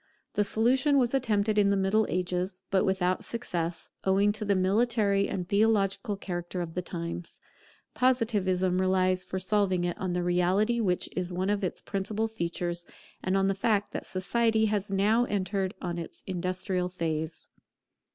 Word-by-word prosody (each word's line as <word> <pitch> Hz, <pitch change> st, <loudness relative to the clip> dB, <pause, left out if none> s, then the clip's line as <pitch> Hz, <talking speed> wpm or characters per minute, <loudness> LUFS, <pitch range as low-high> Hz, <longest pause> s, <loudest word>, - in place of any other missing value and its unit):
The 210 Hz, -, +2 dB
solution 260 Hz, +7 st, +3 dB
was 245 Hz, -2 st, +2 dB
attempted 215 Hz, -5 st, +2 dB
in 200 Hz, -1 st, +4 dB
the 200 Hz, -, +2 dB
Middle 200 Hz, +3 st, +2 dB
Ages; 180 Hz, +1 st, -2 dB
but 190 Hz, -1 st, +3 dB
without 185 Hz, -1 st, +1 dB
success, 175 Hz, -8 st, -4 dB
owing 195 Hz, +2 st, +3 dB
to 215 Hz, -, -5 dB
the 200 Hz, -1 st, +2 dB
military 200 Hz, +1 st, +2 dB
and 180 Hz, -2 st, -3 dB
theological 200 Hz, -1 st, +2 dB
character 175 Hz, -1 st, -4 dB
of 170 Hz, -2 st, -4 dB
the 180 Hz, -, -2 dB
times. 170 Hz, -1 st, -6 dB, 0.5 s
Positivism 195 Hz, -8 st, +2 dB
relies 185 Hz, 0 st, +2 dB
for 190 Hz, -, -4 dB
solving 190 Hz, -1 st, +1 dB
it 175 Hz, -1 st, -1 dB
on 185 Hz, -2 st, -2 dB
the 180 Hz, 0 st, 0 dB
reality 185 Hz, +6 st, +2 dB
which 185 Hz, -5 st, +1 dB
is 180 Hz, 0 st, -2 dB
one 185 Hz, +3 st, 0 dB
of 205 Hz, -1 st, -1 dB
its 185 Hz, -, -2 dB
principal 210 Hz, +3 st, -2 dB
features, 175 Hz, -4 st, -3 dB, 0.4 s
and 185 Hz, +1 st, +1 dB
on 195 Hz, -, +2 dB
the 195 Hz, -, +2 dB
fact 205 Hz, +1 st, 0 dB
that -, -, -5 dB
Society 220 Hz, +4 st, +1 dB
has 210 Hz, -2 st, -1 dB
now 210 Hz, +5 st, +3 dB
entered 195 Hz, -1 st, -1 dB
on 175 Hz, -1 st, -2 dB
its 165 Hz, -, -8 dB
industrial 185 Hz, 0 st, -2 dB
phase. 160 Hz, -2 st, -3 dB
195 Hz, 160 wpm, -28 LUFS, 180-210 Hz, 0.5 s, in